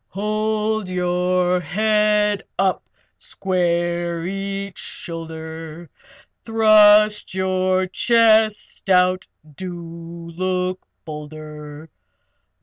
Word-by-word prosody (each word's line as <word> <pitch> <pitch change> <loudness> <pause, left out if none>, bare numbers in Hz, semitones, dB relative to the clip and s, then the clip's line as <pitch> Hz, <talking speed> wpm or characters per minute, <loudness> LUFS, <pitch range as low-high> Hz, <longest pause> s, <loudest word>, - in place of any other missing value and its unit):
Hold 215 0 -1
your 180 0 +1
head 210 +3 +1 0.2
up! 190 0 0 0.3
Square 175 -2 -1
each 195 +1 -4
shoulder! 160 -1 -7 0.5
Thrust 215 -2 +5
your 185 0 +1
chest 220 0 +2
out! 185 0 +3 0.3
Do 170 -1 -8
look 185 0 -1 0.2
bolder! 150 0 -9
185 Hz, 65 wpm, -21 LUFS, 170-210 Hz, 0.5 s, Thrust